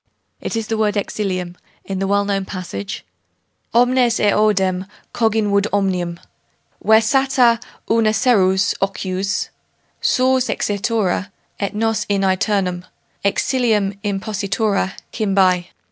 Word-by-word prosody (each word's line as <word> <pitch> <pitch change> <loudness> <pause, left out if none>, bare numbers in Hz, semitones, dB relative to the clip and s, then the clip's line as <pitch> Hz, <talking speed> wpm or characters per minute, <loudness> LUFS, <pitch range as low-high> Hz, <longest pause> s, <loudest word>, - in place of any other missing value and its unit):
It - - -4
is 225 -1 -1
the 220 0 -2
word 210 -1 +1
'exilium' 185 -4 -3 0.3
in 195 -1 -4
the 195 - -1
well 200 +1 +2
known 200 -1 0
passage 175 - -6 0.7
Omnes 245 0 +3
eodem 195 -3 +2 0.3
cogimur, 210 -3 +2
omnium 180 -4 -1 0.6
Versatur 235 +2 +4 0.3
urna 225 -1 +3
serius 195 -4 +3
ocius 195 +1 -2 0.5
Sors 255 0 +2
exitura 200 -2 -1 0.3
et 200 0 -2
nos 225 0 0
in 200 -1 +1
aeternum 185 -1 0 0.4
Exilium 210 -1 +1
impositura 200 0 -1 0.2
cymbae. 190 -4 +2
200 Hz, 100 wpm, -19 LUFS, 190-220 Hz, 0.7 s, Versatur